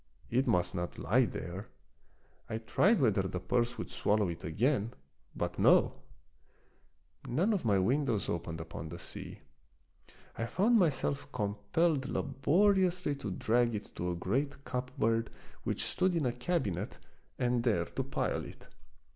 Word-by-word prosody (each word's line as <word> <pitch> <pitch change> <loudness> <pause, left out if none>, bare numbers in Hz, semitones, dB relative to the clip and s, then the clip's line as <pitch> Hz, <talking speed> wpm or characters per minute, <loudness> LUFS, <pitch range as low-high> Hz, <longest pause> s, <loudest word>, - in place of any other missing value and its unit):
It 130 +3 +2
must 90 +1 +2
not 90 -1 -3
lie - - +3
there. 90 +5 -6 0.8
I 110 - -2
tried 190 - +3
whether 110 -8 +3
the 95 -1 -3
purse 120 +6 0
would - - -5
swallow 105 -2 +1
it 85 - -6
again 115 - 0 0.2
— - - -37
but - - -2
no! - - +5 1.3
None 180 - +2
of 195 - -1
my 100 -3 +4
windows 120 +1 +1
opened 85 -1 -3
upon 80 0 -6
the 85 - -7
sea. - - -7 1.0
I 115 - -2
found 220 - +3
myself 140 -4 0
compelled 125 +8 0
labori 175 +10 +3
ously 175 -4 -2
to 105 - -5
drag 120 +4 +1
it 105 - -6
to 90 - -2
a 90 - -1
great 135 +11 -1
cupboard 115 -3 0 0.4
which - - -1
stood 185 -1 +1
in 160 -4 +1
a 125 - +2
cabinet 120 - -2 0.4
and 125 -1 +1
there 105 -9 +2
to - - -4
pile - - -1
it. - - -12
120 Hz, 150 wpm, -32 LUFS, 100-145 Hz, 1.3 s, no